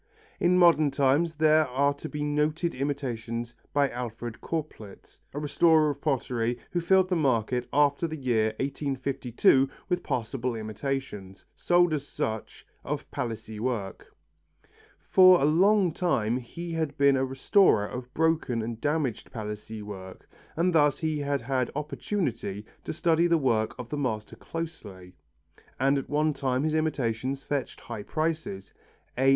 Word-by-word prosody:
In 180 +1 +3
modern 165 -4 +5
times 140 +4 +2
there 155 0 +4
are 140 +3 +1
to 145 +2 -8
be 150 -1 -4
noted 150 +3 0
imitations 120 -4 -3 0.2
by 145 -1 +3
Alfred 120 -1 -6
Corplet, 150 -11 -6
a - - -8
restorer 155 +1 +3
of 140 0 -9
pottery 120 -5 -1
who 175 - 0
filled 190 +2 +4
the 180 - +1
market 125 -5 0
after 145 +3 +2
the 160 - -5
year 120 -6 +1
1852 135 -1 +1 0.2
with 180 0 0
passable 120 +1 -2
imitations, 110 -3 -5
sold 175 -1 +3
as 145 -2 -3
such, 110 -1 -4 0.2
of - - -4
Palissy 110 -2 -5
work. 110 -6 -4 1.0
For 185 -1 +7
a - - +2
long 185 +4 +4
time 125 - 0
he 170 +8 -7
had 160 -3 -2
been 140 -1 +5
a 130 - +1
restorer 135 - +3
of 125 +3 -7
broken 160 -8 +1
and 115 0 -5
damaged 145 -6 -1
Palissy 105 -1 -6
work 95 -2 -9 0.3
and 175 +2 +1
thus 145 -3 +4
he 155 -2 -1
had 140 -2 -1
had 130 0 0
opportunity 140 - -3 0.2
to - - -3
study 170 +1 +2
the 170 -1 +3
work 115 -7 +1
of 125 -2 -7
the 150 - -3
master 110 -6 -3
closely, 105 - -7 0.7
and 135 +2 +3
at - - -8
one 150 +1 +1
time 135 -1 -1
his 155 0 0
imitations 135 -4 -1
fetched 145 -2 -3
high 115 -4 -6
prices. 155 -8 -3 0.4
A. 135 +2 +3
140 Hz, 145 wpm, -27 LUFS, 115-155 Hz, 1.0 s, For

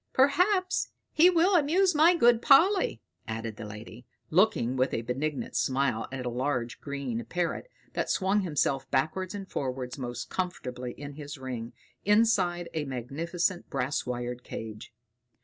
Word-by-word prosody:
"Perhaps 365 +8 +3 0.2
he 335 +3 +6
will 360 +2 +4
amuse 350 +4 +4
my 320 +4 +6
good 240 -7 +5
Polly," 330 - +4 0.2
added 110 -1 -4
the 105 - -7
lady, 110 +3 -10 0.2
looking 165 - +3
with 130 +1 +1
a 115 - -2
benignant 135 +5 -3
smile 130 -4 +1
at 130 -1 -5
a - - 0
large 125 -1 -2
green 140 -5 -4
parrot 175 - -2 0.2
that - - -2
swung 195 +2 +2
himself 140 -6 0
backwards 170 +9 -1
and 195 -1 -6
forwards 130 -3 -4
most 120 -1 -5
comfortably 125 -9 -4
in 145 0 -8
his 145 0 -8
ring, 125 -3 -6 0.3
inside 205 -5 +3
a 155 -2 -2
magnificent 165 +8 -2
brass 135 -1 -1
wired 125 0 -4
cage. 110 -1 -7
145 Hz, 145 wpm, -28 LUFS, 125-205 Hz, 0.3 s, he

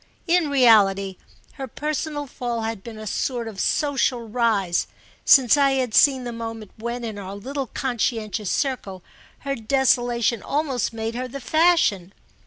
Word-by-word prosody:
In 345 -3 +2
reality 200 -8 +4 0.4
her 265 - -3
personal 300 +2 -3
fall 240 -3 -4
had 225 -2 -4
been 230 -2 -9
a 215 - -8
sort 235 +3 -2
of 210 -3 -8
social 270 -5 0
rise—since 225 +4 +2
I 275 -1 +3
had 255 -4 -1
seen 265 0 +5
the 240 - -5
moment 225 -2 -7
when, 235 +2 -5
in 220 -3 -5
our 195 0 -7
little 270 +6 -5
conscientious 225 -5 -2
circle, 200 -9 -2 0.4
her 275 0 -2
desolation 240 -2 +1
almost 280 -6 -1
made 225 0 -4
her 250 +2 -4
the 275 +3 -7
fashion. 310 - +2
240 Hz, 145 wpm, -23 LUFS, 215-270 Hz, 0.4 s, seen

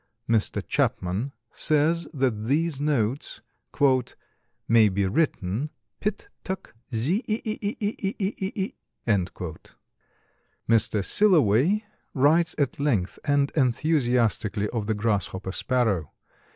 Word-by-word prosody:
Mr. 115 -2 +1
Chapman 95 +10 0 0.2
says 160 +2 +2
that 130 -8 -1
these 145 +2 0
notes 140 -3 -1 1.3
"may 110 -2 +6
be 100 +1 0
written 120 - 0 0.3
pit 210 0 -3 0.2
túck 190 -1 -5 0.2
zee 145 - 0
e 215 +1 0
e 215 0 -2
e 205 0 -2
e 210 -1 -1
e - - -7
e 195 +1 -1
e 190 +1 -3
e." 200 +5 -2 1.9
Mr. 110 -3 +3
Silloway 175 - +4 0.3
writes 155 +5 +3
at 140 -3 -1
length 115 -11 0
and 145 -1 +2
enthusiastically 120 -6 +1
of 110 -4 -3
the 110 - +1
Grasshopper 100 -3 -1
Sparrow. 105 - 0
135 Hz, 110 wpm, -25 LUFS, 110-165 Hz, 1.9 s, may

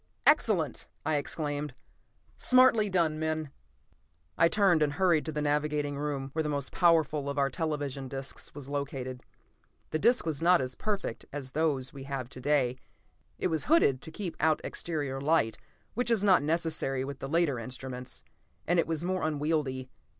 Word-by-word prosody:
"Excellent!" - - +3 0.2
I 155 -1 +2
exclaimed. 145 -2 -3 0.6
"Smartly 255 -5 +5
done, 165 -4 +1
men!" 155 -2 -2 0.8
I 165 - +5
turned 190 -3 +3
and 145 -1 +2
hurried 170 -2 +2
to - - -1
the 150 -1 -2
navigating 150 0 0
room, 140 -2 -3
where 160 - 0
the 150 - -2
most 140 -2 -2
powerful 155 -4 +3
of 140 - -4
our 140 -1 +2
television 145 -2 -3
discs 135 +1 -8
was 145 -2 -8
located. 135 -3 -4 0.7
The 155 - 0
disc 240 +5 +3
was 155 -3 -2
not 175 +1 +5
as 130 0 -2
perfect 200 - -3
as 135 -2 -6
those 140 -3 0
we 135 -1 -8
have 135 -3 -4
to 130 - -9
day; 130 -3 +1 0.6
it - - 0
was 160 -2 0
hooded 195 - +4
to - - -8
keep 175 +1 -5
out 155 0 +3
exterior 145 -5 -3
light, 140 -7 +2 0.3
which 245 +2 0
is 225 -4 +2
not 190 -7 +5
necessary 155 -4 0
with 140 0 -6
the 135 - -5
later 160 -5 +2
instruments, 125 +1 -7 0.4
and 175 0 +2
it - - +2
was 165 0 -1
more 185 0 -1
unwieldy. 145 -4 -1
150 Hz, 170 wpm, -30 LUFS, 135-165 Hz, 0.8 s, Smartly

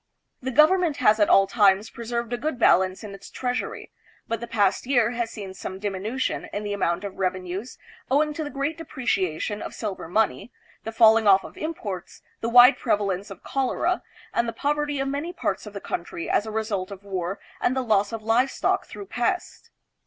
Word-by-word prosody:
The 260 - -3
government 310 +3 +4
has 215 -3 +4
at 205 - +4
all 195 - +6
times 205 -1 +3
preserved 235 0 -4
a - - 0
good 300 0 -2
balance 185 -4 +3
in 205 -2 -7
its 195 - -11
treasury; 250 0 -4 0.4
but 230 - -2
the 235 - -6
past 205 0 +1
year 240 -4 +3
has 235 -2 -2
seen 195 -4 -7
some 190 0 -6
diminution 205 +6 -3
in 205 - -4
the 205 0 -3
amount 175 -3 0
of 200 -1 -6
revenues, 185 +4 -3 0.3
owing 300 +3 +2
to 315 - -4
the 295 - -5
great 290 +3 -3
depreciation 205 - -2
of - - -6
silver 205 -6 -5
money, 220 +6 0 0.3
the 225 - -3
fall 225 -1 +6
ing 220 -2 0
off 195 -1 +6
of - - -11
imports, 215 - -6 0.2
the 230 - -2
wide 245 +3 +8
prevalence 200 -1 0
of 195 - -11
cholera, 275 +7 0 0.3
and 235 - +1
the - - -5
poverty 295 0 -1
of 270 - -1
many 290 +6 -3
parts 205 - -2
of 210 - -9
the 200 - -5
country 170 -2 -5
as 210 - +1
a - - -4
result 215 -4 -2
of 200 -1 -9
war 190 -1 -3 0.2
and 255 - +2
the 260 - +1
loss 205 -3 +2
of 225 -1 -5
livestock 235 +4 +1
through 400 - -8
pest. - - -2
220 Hz, 195 wpm, -25 LUFS, 195-260 Hz, 0.4 s, wide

